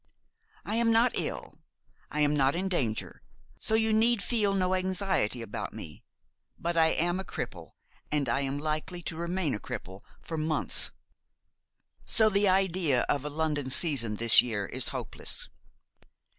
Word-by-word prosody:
I 215 +2 -2
am 235 0 +2
not 230 +2 +4
ill, - - -4 0.5
I 150 - -2
am 150 0 +3
not 135 0 +2
in 185 +2 -1
danger; 125 - -2 0.4
so 220 - 0
you 220 0 +2
need 225 0 +3
feel 210 -4 +1
no 185 -1 +1
anxiety 185 - 0
about 105 - -6
me; 75 - -9 0.5
but 170 0 -3
I 165 -1 +5
am 175 +3 0
a - - -3
cripple; 85 - -7 0.4
and 150 -2 0
I - - 0
am 135 0 -2
likely 155 +4 -3
to 165 - -4
remain 170 -2 -2
a 105 - -3
cripple 95 0 -7 0.2
for 160 -1 -5
months; 155 0 +1 1.1
so 220 -2 +6
the 200 -1 +3
idea 185 -8 +2
of 145 0 0
a - - -2
London 150 -3 -2
season 130 -7 +2
this 115 +1 +7
year 110 -5 -3
is - - -3
hopeless. - - -5
160 Hz, 155 wpm, -29 LUFS, 135-190 Hz, 1.1 s, this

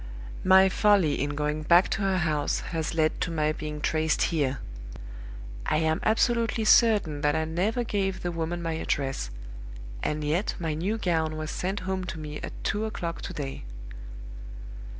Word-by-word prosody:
My 190 +1 +7
folly 190 -7 +3
in 145 +1 -2
going 150 +1 -1
back 170 +4 +5
to - - -1
her 195 -1 +1
house 155 -4 0
has 165 0 -2
led 155 -1 +1
to 180 - 0
my 155 -2 +1
being 150 -1 -5
traced 155 +1 +1
here. 140 -4 0 1.1
I - - +2
am 160 0 +1
absolutely 230 0 +1
certain 205 -11 +4
that 145 +1 +2
I 160 0 0
never 190 +9 0
gave 195 -4 -2
the 175 - -1
woman 170 +1 -3
my 165 -1 -1
address; 135 - -2 0.7
and 150 0 -2
yet 160 +8 0
my 165 -3 -2
new 185 +8 -1
gown 160 -6 0
was 155 0 -4
sent 190 +2 -3
home 190 0 -2
to 170 - -6
me 150 -1 -6
at - - -6
two 215 +1 0
o'clock 170 -6 -4
to - - -6
day! 135 - -5
165 Hz, 170 wpm, -27 LUFS, 155-190 Hz, 1.1 s, My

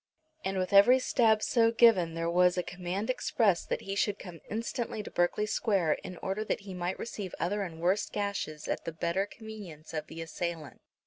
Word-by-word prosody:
And 190 0 -1
with 185 +2 -1
every 205 +6 +8
stab 225 -4 +3
so 230 -2 +3
given 210 -8 +5
there 165 0 -1
was 180 +1 +4
a 180 - +1
command 185 +6 -3
expressed 215 -7 +1
that - - -1
he 195 - -4
should 200 0 +1
come 175 -5 -10
instantly 225 0 -3
to - - -9
Berkeley 175 +4 +1
Square 200 -7 +1
in 185 -1 -7
order 195 +3 -1
that 220 - -2
he 195 -1 -8
might 180 0 -3
receive 205 -5 -6
other 205 +5 0
and 170 -4 -5
worse 185 +5 +1
gashes 200 -7 -3
at - - -2
the 165 - -4
better 170 +5 0
convenience 205 -10 -10
of 155 -1 -3
the 165 - -9
assailant. 165 -2 -5
190 Hz, 195 wpm, -30 LUFS, 170-215 Hz, -, every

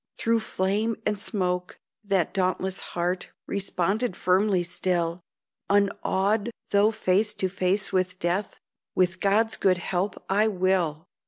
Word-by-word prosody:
Through 230 0 +2
flame 215 +2 -1
and 210 -1 0
smoke 180 -3 -2 0.3
that 195 -5 0
dauntless 185 0 0 0.2
heart 175 +1 -1 0.2
Responded 195 +2 -1
firmly 185 0 +2
still, 175 -1 -1 0.5
Unawed, 200 +1 +1 0.2
though 205 +1 +5
face 210 0 +1
to 190 - 0
face 185 +2 0
with 185 -1 0
death, 180 +4 -2 0.4
"With 185 0 +2
God's 215 +4 +2
good 185 -2 +3
help 180 +2 -2
I 205 +3 +3
will!" 180 -5 0
190 Hz, 120 wpm, -26 LUFS, 180-205 Hz, 0.5 s, though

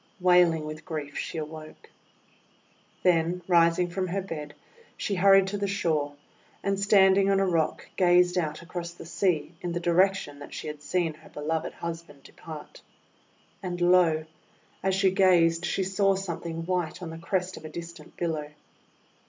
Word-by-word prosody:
Wailing 180 -3 +4
with 155 +1 -7
grief 150 -4 -5
she - - -4
awoke. 155 0 -8 1.1
Then 175 0 +2
rising 170 0 +4
from 185 +1 -2
her 190 +2 -2
bed, 150 -5 -7 0.4
she 205 - -2
hurried 195 +1 +6
to 205 +1 -3
the 200 - -1
shore, 155 -7 -1 0.5
and 195 0 0
standing 195 -1 +5
on 195 0 +3
a 195 - +3
rock 165 -4 0
gazed 180 -1 +4
out 155 -2 -2
across 170 0 -6
the 175 - -11
sea 170 -2 0
in 175 -1 -3
the 175 - -1
direction 175 -3 +1
that 145 - -9
she - - -6
had 150 -1 -6
seen 165 +1 0
her 155 +1 -17
beloved 155 +2 -3
husband 165 -4 -7
depart. 155 -2 -11 0.8
And, 180 -2 -4
lo! 175 -3 +4 0.6
as 190 0 +1
she 190 -1 +3
gazed 175 -3 +4
she 190 +3 0
saw 195 +1 +2
something 170 -3 -5
white 180 -1 -2
on 165 - -5
the 165 - -8
crest 185 +2 -2
of - - -11
a 155 - -7
distant 170 -2 -10
billow. 155 -4 -2
175 Hz, 160 wpm, -27 LUFS, 160-185 Hz, 1.1 s, hurried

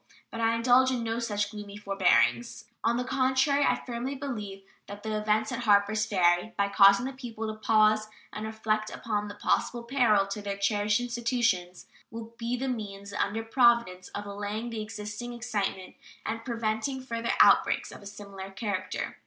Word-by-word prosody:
But 230 - -5
I 225 0 +2
indulge 250 +2 +4
in 250 -3 -1
no 225 0 -2
such 210 -3 -2
gloomy 205 -1 -8
forebodings. 120 - +1 0.2
On 235 +1 +2
the 250 - -1
contrary, 265 +2 +2
I - - +1
firmly 250 +3 -4
believe 210 -8 -6 0.2
that 205 0 -9
the 220 -1 -2
events 215 +1 0
at 240 -1 -4
Harpers 210 +1 +3
Ferry, 180 +3 +2
by 200 0 +1
causing 200 +3 +6
the 270 - -4
people 235 -4 -6
to 215 - -3
pause 215 -1 +3 0.3
and 215 +1 -4
reflect 215 -1 -1
upon 210 -2 -3
the 205 - -8
possible 240 +3 0
peril 235 -5 +3
to 195 +2 -5
their 200 -1 -4
cherished 205 +2 +1
institutions, 235 -7 -1 0.2
will 230 0 -9
be 235 +1 -2
the 265 +2 -3
means 200 -5 -5
under 205 +2 -1
Providence 235 -6 +3
of 205 - -4
allaying 205 +3 -4
the 225 -1 -4
existing 210 +2 -6
excitement 205 -6 -3 0.3
and 225 +1 -3
preventing 235 +2 -2
further 230 -2 -2
outbreaks - - +4
of - - -11
a 200 - -10
similar 200 -1 -9
character. 195 -1 -4
215 Hz, 170 wpm, -28 LUFS, 205-235 Hz, 0.3 s, causing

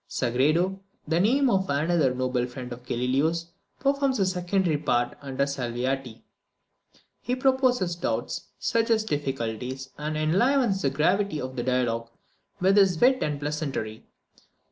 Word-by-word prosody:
Sagredo, 155 +10 +1 0.3
the 165 +2 +1
name 260 +9 +3
of 190 -5 +1
another 150 -1 +2
noble 125 -1 0
friend 125 -1 -7
of 120 +1 -11
Galileo's, 145 +8 0 0.3
performs 275 -1 +1
a 195 - +2
secondary 180 -2 0
part 120 -5 0
under 140 -1 -1
Salviati. 125 -2 -3 1.0
He 245 +3 -1
proposes 255 -8 +2
doubts, 175 - -3
suggests 225 -1 +1
difficulties, 130 - -3
and 155 +1 -3
enlivens 195 - +2
the 135 - +2
gravity 180 +5 +1
of 130 -1 -5
the 120 - -2
dialogue 120 -2 0 0.5
with 190 +2 +3
his 190 -5 +4
wit 260 +1 +4
and 150 -1 -1
pleasantry. 140 -7 -4
155 Hz, 130 wpm, -26 LUFS, 130-195 Hz, 1.0 s, his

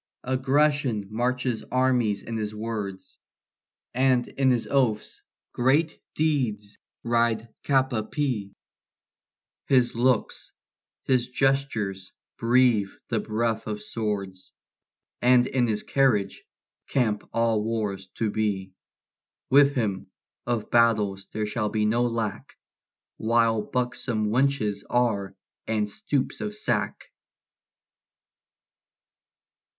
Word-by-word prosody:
Aggression 130 -3 +1
marches 125 +1 -1
armies 125 -6 +2
in 115 - -5
his 105 -1 -3
words; 105 -4 -5 0.7
And 130 -1 +2
in 135 -1 +1
his 120 -2 +1
oaths 125 -6 0 0.3
great 145 +6 +1
deeds 120 -10 -1 0.2
ride 115 -1 +1
cap 135 -2 +2
a 110 - +1
pie; 110 -5 -2 1.2
His 125 -3 +3
looks, 120 0 0 0.5
his 125 -2 +1
gestures 125 -8 0 0.3
breathe 115 -4 +3 0.2
the - - +1
breath 110 +1 -1
of 105 -1 -3
swords; 100 -4 -4 0.7
And 125 0 +5
in 125 -2 +1
his 105 -2 -1
carriage 110 -8 +1 0.4
camp 110 -6 0
all 115 -2 +1
wars 105 -4 -2
to 110 -2 -1
be: 100 -3 -2 0.8
With 140 +1 +6
him 105 -7 -2 0.4
of 120 -3 -2
battles 105 -5 +2
there 110 0 -2
shall 105 0 -1
be 105 0 0
no 120 +3 +2
lack 115 -4 -4 0.6
While 115 -1 +2
buxom 120 -2 -2
wenches 110 -5 +1
are 110 -6 0 0.3
and 110 -2 0
stoops 130 +6 -2
of 210 0 -3
sack. 215 - -1
115 Hz, 105 wpm, -26 LUFS, 105-130 Hz, 1.2 s, With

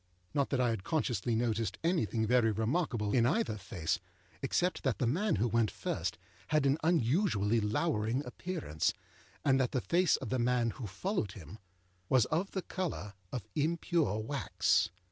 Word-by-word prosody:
Not 140 -2 +1
that 135 - 0
I 125 -1 +3
had 110 -5 -3
consciously 120 -4 0
noticed 115 -1 0
anything 120 - +1
very 115 -1 +4
remarkable 110 - 0
in 120 -2 +4
either 220 - +1
face, 85 -4 -2 0.4
except 175 +7 0
that 130 -4 0
the - - 0
man 180 - +1
who 110 +4 +1
went 115 -1 +2
first 90 +3 -3 0.3
had 150 -2 +2
an 140 +3 +3
unusually 125 - +2
lowering 115 +2 0
appearance, 145 - -2 0.5
and 135 -1 +4
that 130 -2 0
the 130 - +2
face 175 +4 +3
of 130 - -5
the 130 - 0
man 120 -1 +2
who 115 -2 -6
followed 105 - -2
him 95 +3 -10 0.5
was 130 -4 +5
of 180 +5 +1
the 190 - -3
colour 165 - -4 0.2
of 125 - -5
impure 160 - +1
wax. 125 +6 +1
125 Hz, 165 wpm, -32 LUFS, 110-160 Hz, 0.5 s, was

